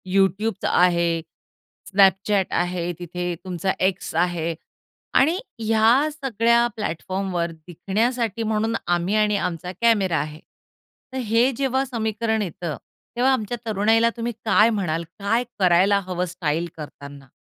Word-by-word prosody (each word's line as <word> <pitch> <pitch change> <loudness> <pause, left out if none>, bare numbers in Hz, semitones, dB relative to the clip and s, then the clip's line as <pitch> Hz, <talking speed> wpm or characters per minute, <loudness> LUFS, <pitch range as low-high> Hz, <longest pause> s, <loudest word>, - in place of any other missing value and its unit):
YouTubeच 195 +2 +1
आहे, 170 -1 +3 0.8
Snapchat 195 0 +4
आहे 175 0 -1
तिथे, 175 0 -4
तुमचा 185 +1 -1 0.2
X 190 - -4
आहे 170 -2 -2 0.7
आणि 325 +7 +3 0.2
ह्या 225 +6 +3
सगळ्या 235 -4 +2
प्लॅटफॉर्मवर 185 -2 -2 0.2
दिसण्यासाठी 225 +5 -1
म्हणून 220 +1 0 0.2
आम्ही 175 +4 -1
आणि 210 -1 +2
आमचा 175 +1 -6
कॅमेरा 205 -7 +3
आहे. 150 +1 -5 0.7
तर - - -3
हे 235 +4 +4
जेव्हा 265 -1 +1
समीकरण 220 -2 -1
येतं, 170 -4 -4 0.4
तेव्हा 255 +2 +3
आमच्या 240 -1 -2
तरुणाईला 225 +2 +3
तुम्ही 235 +1 -2
काय 220 0 +5
म्हणाल, 175 -7 -1 0.2
काय 225 +4 +1 0.2
करायला 190 +2 +4
हवं 180 -1 -1
स्टाईल 165 -1 -1
करताना? 140 -2 -10
200 Hz, 120 wpm, -23 LUFS, 175-230 Hz, 0.8 s, काय